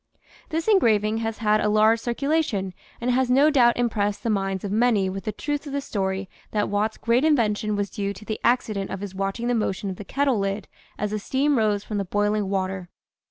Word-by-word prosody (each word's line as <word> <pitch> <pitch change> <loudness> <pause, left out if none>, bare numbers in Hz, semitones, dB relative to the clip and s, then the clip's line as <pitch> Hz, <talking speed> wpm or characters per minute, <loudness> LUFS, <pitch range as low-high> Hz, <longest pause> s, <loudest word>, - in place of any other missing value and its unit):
This 325 +3 -2
engraving 220 - +3
has 225 -1 -3
had 215 -1 +2
a 210 - +1
large 215 +2 +4
circulation 240 - -1 0.3
and 245 +1 0
has 255 0 +2
no 280 +5 +5
doubt 240 -4 +4
impressed 210 -4 0
the 230 - +1
minds 195 -2 -1
of 200 - -3
many 215 -4 +2
with 195 -1 -6
the 215 - -1
truth 290 +5 -4
of 280 - -6
the 280 - 0
story 195 -7 -2 0.2
that 210 -1 -1
Watt's 210 +2 0
great 235 +3 +2
invention 215 -8 +2
was 205 -1 -2
due 200 -1 -2
to 200 +2 -12
the 215 - -4
accident 215 -5 +1
of 195 - -5
his 200 -2 -6
watching 195 +5 -2
the 245 - +2
motion 200 -3 -1
of 185 - -7
the - - -7
kettle 270 +2 0
lid 195 0 -2 0.3
as 210 0 -2
the 215 - -1
steam 275 +7 +1
rose 210 -3 +1
from 210 -2 -3
the - - 0
boiling 205 +1 0
water. 190 -2 -2
215 Hz, 215 wpm, -24 LUFS, 200-245 Hz, 0.3 s, no